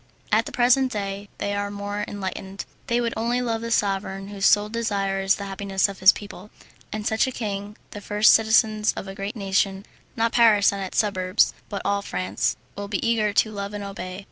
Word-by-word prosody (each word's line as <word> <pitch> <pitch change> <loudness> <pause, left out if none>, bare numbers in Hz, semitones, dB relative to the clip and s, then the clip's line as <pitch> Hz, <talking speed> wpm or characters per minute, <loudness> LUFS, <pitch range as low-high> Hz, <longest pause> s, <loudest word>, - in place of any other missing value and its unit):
At - - +3
the - - -6
present 255 +2 +3
day 200 -2 -4
they 205 0 -2
are 205 0 -2
more 205 0 -4
enlightened, 195 0 -6 0.2
and 240 0 +2
would 230 - -1
only 235 +2 0
love 230 -2 -1
the 230 - -4
sovereign 195 -2 -1
whose 200 -1 +1
sole 205 0 +4
desire 200 -4 -1
is 195 0 +3
the 200 - -7
happiness 195 0 0
of 195 -2 -8
his 190 +1 +8
people, 205 -1 -10 0.4
and 215 -1 -4
such 220 +4 +2
a - - -2
king 205 -3 -5
the 205 - -8
first 210 +2 +5
citizens 220 -1 +3
of - - -5
a 195 - -6
great 195 +3 -5
nation 195 -1 0 0.3
not 230 0 +1
Paris 215 -4 +5
and 200 - -4
its 190 - -5
suburbs, 185 -2 +2 0.2
but 200 - -4
all 200 0 +1
France, 95 - -2 0.2
will 200 0 -5
be 200 +2 -2
eager 220 -3 +2
to 215 +2 +2
love 200 0 -5
and 205 - -5
obey. 190 -2 -6
205 Hz, 205 wpm, -24 LUFS, 195-220 Hz, 0.4 s, his